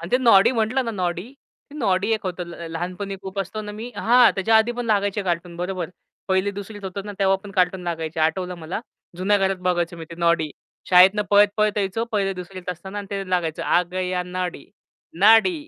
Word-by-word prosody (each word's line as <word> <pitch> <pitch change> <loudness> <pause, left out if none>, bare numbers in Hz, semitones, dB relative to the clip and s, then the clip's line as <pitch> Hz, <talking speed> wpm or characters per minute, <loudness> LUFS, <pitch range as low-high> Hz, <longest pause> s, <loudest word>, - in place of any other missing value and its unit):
आणि 170 +2 -7
ते - - +6
नॉडी 230 -6 +6
म्हटलं 245 +3 0
ना 230 - -2
नॉडी, 185 +4 -3 0.4
नॉडी 200 -6 0
एक 215 - 0
होतं 180 0 -3
ल 170 0 -8
लहानपणी 180 +4 -4
खूप 190 +1 -7
असतो 195 +3 -5
ना 210 - -7
मी 225 +4 -7
हां, 245 +1 +5
त्याच्या 220 +4 +3
आधी 220 +2 +3
पण 245 - -3
लागायचे 205 -1 +1
कार्टून 175 -1 -3
बरोबर. 180 -1 -3 0.4
1ली-2रीत 200 +2 -2
होतं 190 +1 -5
ना 205 - -5
तेव्हा 195 -1 +3
पण 205 - -8
कार्टून 185 -1 +1
लागायचे 165 -1 -3
आठवलं 180 +3 0
मला. 165 +6 -5 0.4
जुन्या 195 +3 +2
घरात 195 -1 +1
बघायचो 175 -1 0
मी 165 - -7
ते 170 - -7
नॉडी 170 -2 +2 0.4
शाळेतनं 190 +3 +7
पळत-पळत 205 +1 +4
यायचो. 200 +3 -1
1ली-2रीत 190 -2 -3
असताना 190 +4 -6
ते 200 -1 -2
लागायचं, 170 -3 -1
आ 175 - +3
गया 185 -1 -1
नॉडी, 180 0 -4 0.6
नॉडी 225 - +6
190 Hz, 185 wpm, -23 LUFS, 180-205 Hz, 0.6 s, शाळेतनं